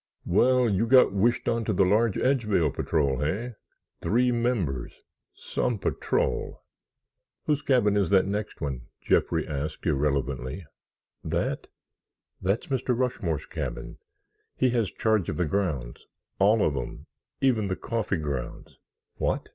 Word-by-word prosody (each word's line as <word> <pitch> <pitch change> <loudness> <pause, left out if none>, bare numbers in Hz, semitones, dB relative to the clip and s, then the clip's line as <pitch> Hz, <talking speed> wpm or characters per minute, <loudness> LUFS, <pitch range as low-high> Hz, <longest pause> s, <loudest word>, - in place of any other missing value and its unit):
"Well, 125 +7 +4
you 100 +4 +1
got 130 -4 +6
wished 115 +5 +1
onto 115 -2 0
the 95 0 +3
large 105 +2 +3
Edgevale 105 - +2
Patrol, 70 -5 0
hey? 105 - -2 0.5
Three 125 +3 +2
members. 115 - -1 0.4
Some 125 -3 -2
patrol!" - - -1 0.8
"Whose 150 -1 +1
cabin 120 -7 +3
is 100 -4 +2
that 95 -1 +4
next 105 +2 -4
one?" 65 -5 -4
Jeffrey - - +1
asked 75 +1 -4
irrelevantly. 70 +1 -1 0.6
"That? - - -2 0.7
That's 100 +5 0
Mr. 130 -2 -1
Rushmore's 100 - -1
cabin. - - -6 0.6
He 130 -1 +2
has 115 -5 +1
charge 110 -1 0
of 75 - -3
the 90 - +1
grounds—all 95 - -1
of 75 - 0
'em, - - -5 0.3
even 115 -6 +2
the 95 - -1
coffee 110 -3 -2
grounds." 70 -5 -5 0.4
"What?" - - -1
100 Hz, 125 wpm, -27 LUFS, 75-120 Hz, 0.8 s, got